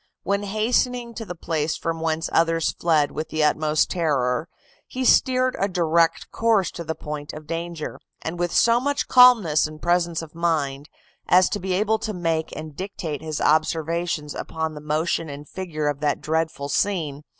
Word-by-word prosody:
When 200 0 0
hastening 235 +4 0
to 225 0 -6
the 180 - -6
place 160 -2 -2
from 165 0 -3
whence 160 0 -1
others 165 -1 +2
fled 155 -4 +1
with 155 - -5
the 155 -1 0
utmost 150 0 +2
terror, 150 -3 0 0.4
he 255 0 -3
steered 255 0 +4
a 195 - +2
direct 170 -3 +1
course 225 -5 +2
to 170 - -7
the 160 0 -4
point 150 0 -6
of 155 0 -9
danger, 165 0 -5 0.2
and 170 +2 -5
with 175 -1 0
so 235 0 +4
much 285 +2 -1
calmness 230 -13 +6
and 155 0 -11
presence 175 -1 +1
of 155 - -11
mind, 150 -4 -1 0.4
as 180 +1 +5
to 205 - -2
be 190 -1 -2
able 215 +3 +1
to 220 -1 -4
make 165 -3 -1
and 155 -1 -8
dictate 170 -6 -5
his 155 -1 -4
observations 160 0 0
upon 160 -1 -4
the 150 - -9
motion 155 +2 -1
and 145 +1 -8
figure 160 -5 -4
of 145 -1 -1
that 145 -1 0
dreadful 160 -2 -2
scene. 155 -3 -1
165 Hz, 175 wpm, -23 LUFS, 155-185 Hz, 0.4 s, calmness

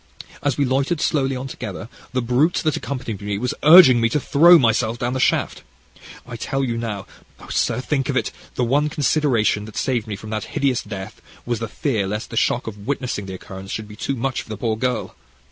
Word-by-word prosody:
As 145 -3 0
we 145 - +2
loitered 135 +5 0
slowly 135 -4 +1
on 130 +1 -5
together, 110 -6 -7 0.2
the 130 -1 -1
brute 130 +8 +2
that 155 -2 +1
accompanied 125 -7 -5
me 100 0 -2
was 125 +4 -2
urging 150 -6 +8
me 115 - +3
to 150 - +1
throw 170 +6 +6
myself 115 -3 +2
down 120 +1 -2
the 130 - -2
shaft. - - +1 0.6
I 120 - -8
tell 135 +4 -2
you 120 -3 -1
now 110 -4 -4 0.3
oh, - - -13
sir, - - 0
think 135 +1 -1
of 135 - 0
it! - - -1 0.2
the 125 - 0
one 145 +5 +2
consideration 140 -8 +1
that 110 -1 -10
saved 120 -4 -1
me 105 - -4
from 105 +3 -9
that 110 -1 -3
hideous 135 -3 +1
death 95 -2 -8 0.2
was 120 -2 -2
the 115 - -3
fear 110 -6 -1
lest 105 +3 -4
the - - -6
shock 120 +2 +1
of 105 -1 -8
witnessing 125 -7 -2
the 95 - -6
occurrence 95 +1 -10
should 110 +1 -4
be 105 - -11
too 140 - -3
much 130 +1 -2
for - - -16
the 110 - -5
poor 110 0 -1
girl. 125 +3 -2
120 Hz, 220 wpm, -21 LUFS, 110-135 Hz, 0.6 s, urging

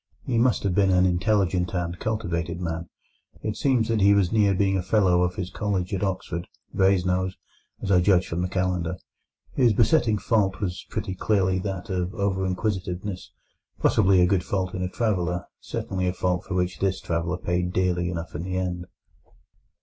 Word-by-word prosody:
He 120 -4 +1
must 120 -1 +2
have 100 -2 +1
been 100 +1 +3
an 90 0 +4
intelligent 90 0 +1
and 85 -1 -2
cultivated 85 -7 -2
man. 85 -1 -4 0.5
It 105 - -2
seems 125 -2 +2
that 115 -3 +1
he 100 +1 +6
was 95 -3 +2
near 105 -3 +3
being 95 0 +2
a 95 - +1
Fellow 90 -2 +3
of 90 0 0
his 95 0 -4
college 95 -3 -2
at 95 - -1
Oxford—Brasenose, 95 0 -1 0.5
as 100 - -1
I 90 -2 +5
judge 90 -1 +3
from 85 +2 -2
the 90 - 0
Calendar. 90 -2 -1 0.6
His 120 -4 +4
besetting 115 -3 +3
fault 100 -4 +1
was 95 -1 -4
pretty 95 - -3
clearly 95 -1 +1
that 95 +1 -4
of 90 +2 -2
over 95 -2 0
inquisitiveness, 95 -1 -3 0.5
possibly 95 -3 +4
a - - +6
good 90 -1 +1
fault 95 -1 -2
in 95 - -3
a 90 - -1
traveller, 90 -5 -1
certainly 95 -1 -3
a 90 - 0
fault 90 -1 -1
for 95 - -4
which 90 0 -1
this 95 -1 0
traveller 85 +1 -2
paid 90 0 -1
dearly 90 -1 0
enough 85 -1 -5
in 75 - -4
the 90 +1 -3
end. 90 -1 -3
95 Hz, 180 wpm, -25 LUFS, 90-100 Hz, 0.6 s, he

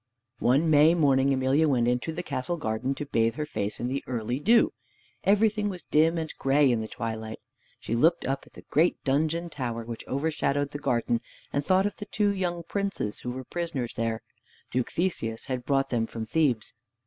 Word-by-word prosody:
One 140 +7 +3
May 155 +3 +6
morning 140 -4 +3
Emelia 135 +4 +3
went 125 -5 +2
into 125 +6 0
the 175 +2 -4
castle 170 +3 -2
garden 130 -1 -2
to 150 - -4
bathe 115 -4 +1
her 150 - -2
face 105 -7 -3
in 120 - -1
the 135 +2 -2
early 120 +1 -2
dew. 230 +10 +4 0.5
Everything 210 +1 +3
was 180 -3 -7
dim 160 +2 +3
and 160 -1 -3
gray 135 0 +4
in 115 -2 +1
the 110 - -4
twilight. 110 -1 -5 0.4
She - - -4
looked 160 +9 +3
up 135 +1 -2
at - - -20
the - - -12
great 165 +4 +1
dungeon 160 +5 +1
tower 120 -4 -4
which 115 -1 -6
overshadowed 145 -1 0
the 145 - -5
garden, 120 -3 0 0.3
and 145 - +1
thought 185 +5 +3
of 205 - -2
the 210 - -6
two 205 0 +1
young 175 -3 -2
princes 195 - -3
who 125 - -5
were 130 +1 -5
prisoners 155 -6 -3
there. 115 -1 -2 0.5
Duke 125 0 0
Theseus 115 -11 -2
had 130 -2 -3
brought 135 -1 +1
them 115 -2 +1
from 115 -1 -5
Thebes. 125 -3 +1
140 Hz, 195 wpm, -27 LUFS, 120-165 Hz, 0.5 s, May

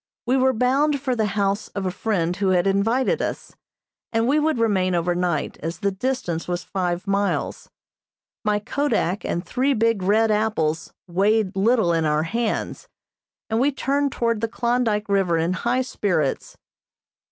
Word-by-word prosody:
We 250 +2 +2
were 260 0 +4
bound 275 +5 +2
for 260 -2 -1
the 220 -2 +1
house 200 +1 0
of 200 -1 -2
a 185 - 0
friend 180 -4 -1
who 200 0 -1
had 185 -1 +3
invited 230 - +1
us, - - -4 0.6
and 225 0 +1
we 290 +4 +3
would 310 -2 +1
remain 190 -5 +1
over 175 +1 +1
night, 175 -3 -1
as 165 +2 -4
the 200 -1 0
distance 190 -6 -2
was 175 0 -2
five 180 -1 -2
miles. 200 0 -1 0.7
My 210 -2 +2
kodak 210 -4 -1
and 175 +2 -2
three 260 +9 +1
big 230 -2 +1
red 215 +4 +3
apples 190 -8 0 0.2
weighed 200 +3 +1
little 200 -3 +3
in 165 -1 +1
our 150 0 +1
hands, 230 +7 -2 0.6
and 220 0 0
we 275 +4 +3
turned 280 +1 0
toward 230 -3 -1
the 230 - +1
Klondyke 235 -2 0
River 195 -4 +2
in 165 +2 0
high 245 +6 0
spirits. 180 - -1
210 Hz, 165 wpm, -23 LUFS, 180-240 Hz, 0.7 s, were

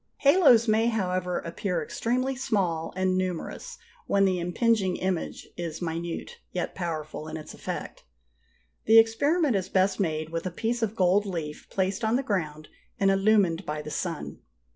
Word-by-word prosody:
Halos 280 -6 +6
may, 220 +1 +3
however, 185 -5 -1
appear 170 0 -2
extremely 255 - -1
small 185 -10 -1
and 185 0 +1
numerous 185 - -3 0.3
when 200 0 +3
the 185 -2 +1
impinging 190 +2 +1
image 185 -3 -3
is 170 -2 -4
minute, 170 - -4
yet - - -3
powerful, 155 -3 -4
in 155 0 -5
its 155 - -9
effect. - - -6 0.8
The 225 +1 +7
experiment 270 +6 +4
is 190 -1 -1
best 190 +1 +2
made 155 -4 -1
with 165 +2 -3
a - - -1
piece 230 +6 -2
of 220 -1 -1
gold 195 +1 +3
leaf 160 -5 -5
placed 190 +3 -1
on 220 +1 +2
the 270 - +1
ground 155 - -2 0.3
and 195 -1 +4
illumined 195 -3 +3
by 150 -2 -4
the 150 - -7
sun. 165 0 -4
190 Hz, 160 wpm, -27 LUFS, 170-225 Hz, 0.8 s, The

